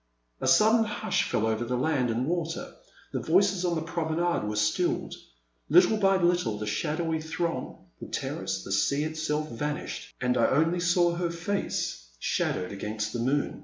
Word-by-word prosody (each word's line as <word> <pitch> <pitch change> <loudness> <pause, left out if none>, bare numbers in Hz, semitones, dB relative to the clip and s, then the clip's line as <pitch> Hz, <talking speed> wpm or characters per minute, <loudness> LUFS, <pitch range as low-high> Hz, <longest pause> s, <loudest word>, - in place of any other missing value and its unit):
A - - -2
sudden 220 +1 +5
hush 210 -3 -1
fell 110 - +1
over 110 +1 0
land 130 -1 +1
and 115 +3 0
water, 165 0 -3 0.4
the - - 0
voices 190 +2 +2
on 175 -1 +1
the 160 - -2
promenade 165 -4 -1
were 105 - -2
stilled; 105 0 0 0.6
little 220 - +6
by 195 -2 +4
little 175 - +1
the 105 - -4
shadowy 155 +10 -1
throng, 165 +1 -4
the - - -8
terrace, - - -3
the - - -7
sea 140 +9 +2
itself 155 -1 -2
vanished, 145 +6 -4
and 125 0 +1
I - - +4
only 160 +5 +2
saw 175 0 +3
her 170 0 -1
face, 170 - -3
shadowed 90 +8 -1
against 105 +2 -4
the 120 - -2
moon. 135 +5 0
160 Hz, 165 wpm, -28 LUFS, 120-175 Hz, 0.6 s, little